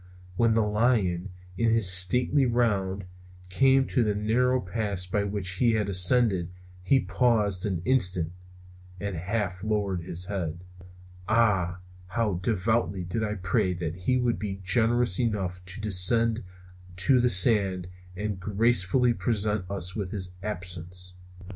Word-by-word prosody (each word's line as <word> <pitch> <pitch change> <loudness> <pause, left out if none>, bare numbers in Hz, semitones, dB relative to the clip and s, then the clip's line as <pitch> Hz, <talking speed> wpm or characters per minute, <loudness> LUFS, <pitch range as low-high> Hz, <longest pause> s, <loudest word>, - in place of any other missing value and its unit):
When 115 +3 +2
the 115 - +3
lion, 105 -4 0 0.3
in 115 - +2
his 115 -3 +3
stately 125 +9 +4
round, 100 -5 -1 0.4
came 135 +6 +3
to 125 - +1
the 105 -2 -1
narrow 125 +5 +1
pass 100 -1 -2
by 100 +3 -1
which 100 -2 -4
he 115 +1 +2
had 105 -2 -1
ascended 95 -1 +3 0.3
he 130 +9 +3
paused 105 -6 +1
an 90 -4 -3
instant, 90 -10 +1 0.7
and 100 0 -4
half 95 +1 -3
lowered 100 -4 -1
his 85 +1 -2
head. 90 -3 -5 0.7
Ah, 95 -6 +1 0.3
how 105 -2 -1
devoutly 100 -2 -1
I - - -5
did 105 +2 -4
pray 90 0 0
that 85 -2 -4
he 95 +8 0
would 125 -2 0
be 100 -2 -5
generous 115 +1 +2
enough 95 -6 -2
to 95 +4 -7
descend 110 +3 +3 0.5
to 95 +8 +3
the 125 - +2
sands 95 -2 +3 0.3
and 105 0 -4
gracefully 110 +4 +2
present 105 -5 -1
us 90 -2 -4
with 100 -4 -4
his 95 -3 -4
absence. 90 -2 -4
100 Hz, 140 wpm, -26 LUFS, 90-115 Hz, 0.7 s, stately